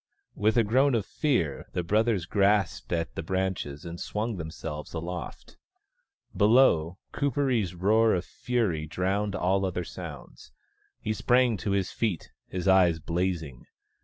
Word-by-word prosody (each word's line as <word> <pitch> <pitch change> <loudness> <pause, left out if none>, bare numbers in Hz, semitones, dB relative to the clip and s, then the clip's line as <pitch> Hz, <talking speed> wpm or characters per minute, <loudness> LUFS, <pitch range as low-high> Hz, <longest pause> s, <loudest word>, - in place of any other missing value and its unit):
With 110 +2 +1
a 115 - +5
groan 130 +5 +3
of 110 - 0
fear, 85 - -1
the 90 - -1
brothers 105 0 +1
grasped 100 0 +1
at 85 -1 -1
the - - -4
branches 90 -5 -3
and 85 0 -7
swung 110 0 -3
themselves 80 -2 -6
aloft. 85 -1 -6 0.8
Below, 100 -7 +4 0.2
Kuperee's 130 - 0
roar 110 +5 +3
of 90 - -2
fury 105 -11 -1
drowned 100 +4 -1
all 95 +2 +1
other 90 -2 -1
sounds. 85 -4 -10 0.5
He 110 - -2
sprang 120 +1 +3
to 100 - -4
his 95 -2 0
feet, 105 -8 -2 0.2
his 90 0 -4
eyes 90 -3 +5
blazing. 80 -5 -3
95 Hz, 135 wpm, -27 LUFS, 85-110 Hz, 0.8 s, a